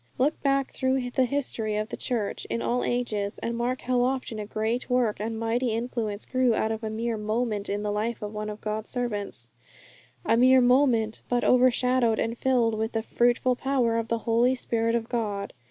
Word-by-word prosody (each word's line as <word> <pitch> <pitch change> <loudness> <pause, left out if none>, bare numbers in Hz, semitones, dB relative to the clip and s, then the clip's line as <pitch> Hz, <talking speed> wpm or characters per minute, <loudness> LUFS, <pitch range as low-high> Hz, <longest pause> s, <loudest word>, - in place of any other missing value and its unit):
Look 285 +5 +1
back 275 -1 +1
through 260 -1 -1
the 260 0 +2
history 235 -5 -1
of 215 +1 -2
the - - -4
Church 225 -5 -3
in 230 - -2
all 245 +1 0
ages, 215 -5 -1
and 230 0 -3
mark 245 +2 -1
how 250 0 +1
often 255 -3 -1
a 210 - -5
great 225 +4 -2
work 250 -4 +1
and 220 +1 -3
mighty 230 +1 0
influence 225 -3 -3
grew 255 -3 +2
out 220 - 0
of 220 +1 -4
a 220 - -2
mere 225 +1 -2
moment 215 -1 -2
in 205 +1 -2
the 210 - -1
life 215 +2 -2
of 210 +1 -5
one 210 0 -4
of 210 0 -7
God's 215 +1 -4
servants; 205 - -4 0.7
a 225 +1 +3
mere 260 +2 +6
moment, 245 -3 +3
but 245 0 +1
overshadowed 250 -2 +3
and 225 +1 -1
filled 240 -2 +2
with 220 +1 -2
the 225 -1 -1
fruitful 245 +2 +2
power 250 -3 +1
of 230 - -3
the 230 +2 +2
Spirit 230 -2 0
of 230 -1 -1
God. 205 -5 -3
230 Hz, 195 wpm, -26 LUFS, 220-250 Hz, 0.7 s, mere